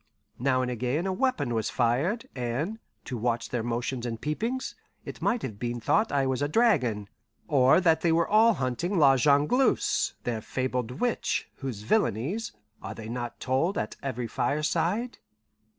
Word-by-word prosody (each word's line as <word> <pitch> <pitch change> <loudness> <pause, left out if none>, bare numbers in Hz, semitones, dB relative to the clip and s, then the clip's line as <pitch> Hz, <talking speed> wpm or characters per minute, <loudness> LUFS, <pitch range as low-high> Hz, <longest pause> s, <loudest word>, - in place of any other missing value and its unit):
Now 130 0 +2
and 125 - -2
again 125 - -1
a 190 - 0
weapon 185 - 0
was 110 -2 -1
fired, 135 - 0
and, 135 - -2 0.3
to 125 -3 -4
watch 115 0 -1
their 120 - -1
motions 120 +2 -2
and 115 -2 -4
peepings, 225 - -2 0.3
it - - -8
might 240 -1 +1
have 105 -5 -5
been 120 0 -3
thought 215 - +2
I 140 -1 +2
was 130 0 -1
a 145 - +2
dragon, 135 - +2 0.4
or 135 +1 +5
that 165 -3 +3
they 170 - +2
all 205 +7 +4
were - - +4
hunting 140 +10 -1
La 140 -4 +6
Jongleuse, 145 - +2
their 120 -4 -2
fabled 125 0 -2
witch, 245 -2 -1
whose 125 -7 -5
villainies, 120 - 0 0.3
are - - -6
they 110 -1 -8
not 120 0 -5
told 135 +10 0
at - - -3
every 125 -3 -3
fireside? 165 - -1
135 Hz, 165 wpm, -27 LUFS, 120-175 Hz, 0.4 s, La